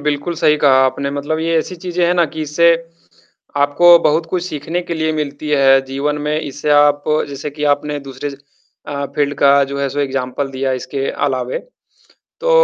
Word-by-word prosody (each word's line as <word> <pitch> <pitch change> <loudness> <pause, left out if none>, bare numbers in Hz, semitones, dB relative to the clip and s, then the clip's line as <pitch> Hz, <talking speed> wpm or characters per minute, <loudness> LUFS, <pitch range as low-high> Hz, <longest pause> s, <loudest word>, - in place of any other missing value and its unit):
बिल्कुल 150 +3 -2
सही 150 -1 +3
कहा 140 -3 +4
आपने। 140 +1 -1
मतलब 145 +3 -3
ये 165 0 0
ऐसी 180 +3 -4
चीज़ें 180 0 -2
है 175 - +2
ना 175 -1 +3
कि 155 +2 -6
इससे 170 +3 +3 0.8
आपको 170 +5 +6
बहुत 160 +1 +1
कुछ 175 +1 -2
सीखने 165 +1 -3
के 175 - -5
लिए 160 -1 -1
मिलती 150 0 -4
है 135 -2 +5
जीवन 140 +3 -2
में 150 +1 -1
इससे 145 +1 -4
आप 145 0 +4 0.2
जैसे 140 +1 -6
कि 150 +1 -5
आपने 145 0 -5
दूसरे 135 +1 -6 0.6
अ, 140 -1 -3
फ़ील्ड 145 -1 0
का 140 0 +5
जो 140 +1 -6
है 140 - 0
सो 145 - -5
एग्ज़ाम्पल 135 0 -2
दिया 135 0 -2
इसके 135 +2 -3
अलावे। 130 -2 -2 0.8
तो - - 0
145 Hz, 185 wpm, -17 LUFS, 140-160 Hz, 0.8 s, आपको